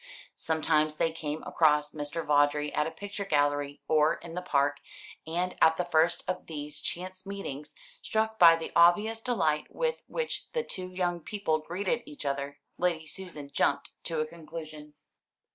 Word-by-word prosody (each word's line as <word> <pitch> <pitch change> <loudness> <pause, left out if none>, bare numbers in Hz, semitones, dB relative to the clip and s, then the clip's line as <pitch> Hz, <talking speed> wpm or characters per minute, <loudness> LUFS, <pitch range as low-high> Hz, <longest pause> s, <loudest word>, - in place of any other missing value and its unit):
Sometimes 155 -1 +1
they 165 +1 +1
came 155 -1 -4
across 150 -2 +3
Mr. 150 +2 -4
Vawdrey 145 0 +3
at 150 - +1
a - - -1
picture 200 +5 -6
gallery 145 -4 0
or 155 0 +4
in 170 - -10
the 180 - -3
Park; 145 -4 +1 0.5
and 175 +3 -1
at 160 0 +6
the 180 - 0
first 170 0 +2
of 185 - -3
these 150 -2 -5
chance 185 +1 -4
meetings, 175 -8 -6 0.3
struck 220 0 -1
by 165 -1 +9
the 165 - -5
obvious 210 +7 +5
delight 160 -12 +1
with 485 -1 -1
which 480 -1 -3
the 475 -1 0
two 185 - -5
young 175 -1 -1
people 170 -3 -1
greeted 190 +9 -1
each 295 -2 -7
other, 140 0 -2 0.2
Lady 170 -3 +1
Susan 155 -5 -8
jumped - - +1
to 165 -2 -1
a 155 - +1
conclusion. 155 -2 -9
160 Hz, 160 wpm, -29 LUFS, 150-185 Hz, 0.5 s, by